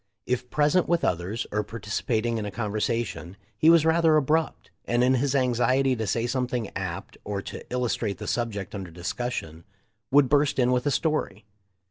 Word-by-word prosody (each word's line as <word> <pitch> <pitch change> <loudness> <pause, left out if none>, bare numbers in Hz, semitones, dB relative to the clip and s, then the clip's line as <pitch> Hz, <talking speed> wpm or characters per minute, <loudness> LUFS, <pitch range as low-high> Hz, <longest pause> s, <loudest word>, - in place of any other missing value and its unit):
If 125 0 -2
present 150 +6 +2
with 170 -1 +2
others, 90 +7 -1
or 105 - +1
participating 110 +2 -2
in 105 - -4
a - - -5
conversa 115 +2 -1
tion, 95 -1 -9 0.2
he 155 +9 +4
was 165 -2 +6
rather 160 -1 +4
abrupt, 155 +3 0
and 120 +1 +2
in 130 +1 +4
his 135 +2 +1
anxiety 130 +1 +2
to 110 -2 -3
say 115 +3 0
something 125 -3 -2
apt 95 -1 -5
or 100 -1 -4
to - - -7
illustrate 120 -4 -1
the - - -7
subject 105 -5 -3
under 95 -3 -6
discussion, 85 -1 -4 0.5
would 140 0 +5
burst 145 +1 +2
in 125 -1 +3
with 125 +2 +1
a - - +2
story. 145 - -1
120 Hz, 175 wpm, -26 LUFS, 105-135 Hz, 0.5 s, was